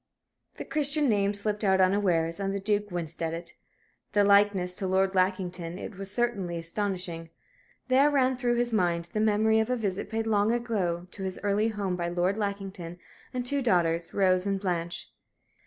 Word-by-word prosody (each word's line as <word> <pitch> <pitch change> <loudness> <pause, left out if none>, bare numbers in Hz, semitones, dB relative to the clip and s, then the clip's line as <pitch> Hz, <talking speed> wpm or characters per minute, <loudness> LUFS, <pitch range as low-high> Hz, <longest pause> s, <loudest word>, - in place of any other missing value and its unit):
The - - -7
Christian 295 -1 +1
name 200 -3 +2
slipped 210 +1 -2
out 190 -1 +3
unawares, 185 -3 +2
and 195 0 -1
the - - -1
Duke 205 +1 0
winced 170 -3 -4
at 165 0 -1
it. 170 +1 -7 0.6
The 205 - +4
likeness 200 -2 +4
to 190 - -2
Lord 190 +1 +2
Lackington 185 -2 -1
it 215 - -7
was 195 +1 -6
certainly 205 -6 -1
astonishing. 170 -1 -3 0.6
There 265 +3 +5
ran 265 -3 +2
through 245 -1 0
his 240 -1 0
mind 170 -4 +1
the 215 - 0
memory 220 +1 +3
of 220 - 0
a 250 - +2
visit 200 -5 -3
paid 225 0 -2
long 210 0 +2
ago 205 -8 -1
to - - -8
his 190 -1 -4
early 205 +2 +2
home 200 -4 -2
by 175 -1 -2
Lord 175 +3 0
Lackington 195 -4 -4 0.3
and 250 -1 -3
two 280 +2 0
daughters, 170 -7 +1
Rose 185 -1 +2
and 195 -1 0
Blanche. 175 -3 -3
195 Hz, 180 wpm, -28 LUFS, 180-220 Hz, 0.6 s, There